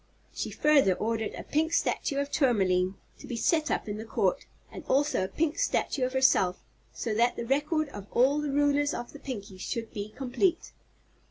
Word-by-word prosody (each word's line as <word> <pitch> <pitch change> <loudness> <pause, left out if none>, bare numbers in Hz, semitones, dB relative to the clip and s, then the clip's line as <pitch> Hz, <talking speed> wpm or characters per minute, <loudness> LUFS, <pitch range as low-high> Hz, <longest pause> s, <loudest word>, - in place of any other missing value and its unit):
She - - -3
further 280 -11 +4
ordered 225 +1 -2
a - - -7
pink 320 +2 0
statue 280 -3 0
of 280 0 -1
Tourmaline 190 -8 +2 0.2
to - - -11
be 245 - -4
set 310 +7 +1
up - - -1
in 205 0 -3
the 220 - -5
Court, - - -1 0.2
and - - -8
also 285 -6 +2
a - - -1
pink 305 +10 -1
statue 305 - 0
of 255 - -4
herself, 195 -9 +3 0.3
so 225 - -3
that 235 +3 +2
the 235 - -4
record 295 +4 +1
of 205 -5 -9
all 270 +4 +3
the 300 - -2
rulers 290 +1 +2
of 240 - -6
the 290 - -10
Pinkies 200 -9 -7
should 230 0 -4
be 205 0 -5
complete. 275 - -1
260 Hz, 190 wpm, -28 LUFS, 215-290 Hz, 0.3 s, further